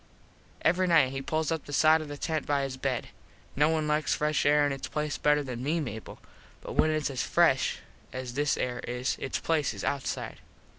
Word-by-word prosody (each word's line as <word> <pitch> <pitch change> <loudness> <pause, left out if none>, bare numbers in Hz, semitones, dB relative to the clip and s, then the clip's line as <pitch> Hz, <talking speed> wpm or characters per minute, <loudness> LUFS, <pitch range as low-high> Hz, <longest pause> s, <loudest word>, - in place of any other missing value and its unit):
Every 180 +3 +3
nite 160 -7 +4
he 135 0 -4
pulls 155 +3 -1
up 160 -2 -2
the 145 - -8
side 155 +2 +5
of 155 - -7
the 145 0 -7
tent 160 0 -2
by 145 -1 +1
his 135 -1 -3
bed. 130 -2 -2 0.5
No 150 +2 +4
one 155 -1 0
likes 150 0 +1
fresh 150 -1 +1
air 145 0 +5
in 145 - 0
its 135 -1 -4
place 150 -1 -3
better 150 0 +3
than 125 -3 -5
me, 155 +6 0
Mable, 110 -7 -6 0.4
but - - -7
when 155 - +3
its 155 -2 0
as 130 - -2
fresh - - +2 0.3
as 130 -1 -5
this 145 +2 +1
air 125 -1 -2
is 125 +2 -1
its 135 - -2
place 160 -3 0
is - - -7
outside. 140 -2 -3
145 Hz, 210 wpm, -28 LUFS, 135-155 Hz, 0.5 s, side